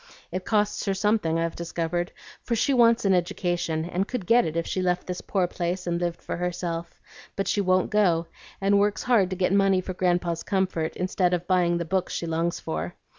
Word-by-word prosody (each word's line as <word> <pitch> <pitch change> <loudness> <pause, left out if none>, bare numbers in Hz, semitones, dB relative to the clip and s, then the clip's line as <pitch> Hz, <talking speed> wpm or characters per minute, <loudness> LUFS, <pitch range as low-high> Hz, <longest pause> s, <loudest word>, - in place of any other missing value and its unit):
It 185 0 -4
costs 210 -1 +1
her 195 -1 0
something, 200 -5 +1
I've 165 0 -1
discovered, 170 +1 -2 0.3
for 235 - -1
she 275 +5 +2
wants 235 -3 +4
an 195 - +4
education, 175 -2 -1
and 180 +3 -1
could 245 -7 -4
get 235 +5 +4
it 160 +1 -3
if 165 - 0
she 185 - -2
left 180 -1 0
this 180 -1 -4
poor 190 -3 0
place 180 +1 -3
and 170 0 -1
lived 175 -1 -3
for - - -4
herself; 170 -1 -4 0.4
but 195 - -2
she 205 - +1
won't 185 -1 +2
go, 180 -6 +3 0.3
and 200 +1 +3
works 205 0 +1
hard 225 -7 +3
to 185 - -3
get 185 +1 +1
money 195 -1 +4
for 185 0 -4
Grandpa's 175 -2 0
comfort, 185 -5 -1
instead 180 0 +1
of 175 0 -5
buying 175 -2 +2
the 170 - -2
books 185 +2 -1
she - - -3
longs 165 +1 -1
for. 80 +2 -4
180 Hz, 210 wpm, -26 LUFS, 170-195 Hz, 0.4 s, wants